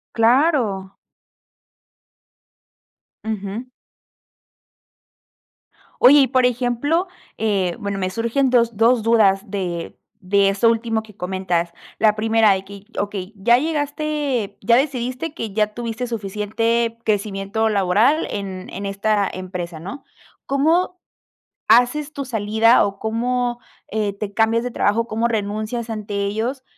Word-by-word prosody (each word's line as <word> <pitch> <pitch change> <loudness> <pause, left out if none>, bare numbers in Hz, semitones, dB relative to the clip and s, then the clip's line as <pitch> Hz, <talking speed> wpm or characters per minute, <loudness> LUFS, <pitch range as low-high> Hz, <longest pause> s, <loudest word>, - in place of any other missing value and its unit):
Claro. 230 - +2 2.3
Ujú. 215 +1 -4 2.4
Oye, 280 +4 +8
y, 270 - +4
por 255 -1 +2
ejemplo, 250 +8 0 0.3
eh, 195 -5 0
bueno, 200 -2 -3
me 185 - -1
surgen 235 +6 0
2 235 -2 +2
2 230 +1 +4
dudas 210 -3 +3
de 175 -4 -4 0.2
de 195 +1 +3
eso 200 +4 +3
último 225 -1 -1
que 215 -2 -16
comentas. 180 -2 -2 0.3
La 215 -1 +4
primera 220 0 +3
de 190 0 -4
que: 200 0 -12
"Okey, 200 -1 -4
ya 235 +5 +4
llegaste 290 -6 -2
ya 230 +4 +4
decidiste 260 +2 -1
que 225 -10 -5
ya 210 0 +1
tuviste 240 +1 -4
suficiente 225 +2 -1
crecimiento 205 +1 0
laboral 210 - +2
en 190 -2 -5
en 200 - -6
esta 200 +1 0
empresa", 180 -3 -6
¿no? 265 - -8 0.4
¿Cómo 330 +6 +1 0.7
haces 250 +7 +3
tu 280 -1 -5
salida 220 0 +3
o 200 0 -5
cómo, 240 +2 -1 0.3
eh, 210 -2 -2
te 200 0 -6
cambias 225 +2 +2
de 245 - -4
trabajo? 230 +1 +1
¿Cómo 230 +1 0
renuncias 215 +2 -3
ante 210 -2 -5
ellos, 230 +6 -2
220 Hz, 120 wpm, -21 LUFS, 200-245 Hz, 2.4 s, Oye